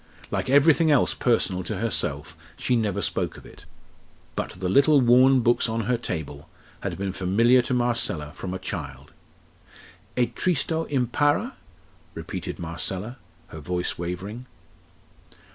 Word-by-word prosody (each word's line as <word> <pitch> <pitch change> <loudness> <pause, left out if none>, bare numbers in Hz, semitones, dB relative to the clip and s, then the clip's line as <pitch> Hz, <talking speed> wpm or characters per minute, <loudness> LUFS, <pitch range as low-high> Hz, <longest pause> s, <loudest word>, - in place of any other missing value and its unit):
Like - - -2
everything 155 +4 +5
else 145 -4 +4
personal 100 -6 +1
to 105 +2 -3
herself 80 -8 -2 0.2
she 125 - 0
never 105 -4 0
spoke - - -1
of - - -14
it; - - -15 0.7
but - - -2
the 90 0 -4
little 140 +9 +5
worn 130 +1 +5
books 120 0 +2
on 115 +1 -1
her 120 +3 0
table 80 -10 -6 0.3
had - - -4
been 95 -1 -3
familiar 115 +8 +3
to 125 - -2
Marcella 120 -11 0
from 90 - -6
a 95 - -3
child. 70 -6 -7 1.0
"E 125 - +4
tristo 160 +2 -1
impara?" 145 - +1 0.6
repeated 90 +3 -6
Marcella, 95 +7 -4 0.3
her 80 - -9
voice 90 +4 -3
wavering. 95 +8 -5
110 Hz, 135 wpm, -25 LUFS, 90-125 Hz, 1.0 s, everything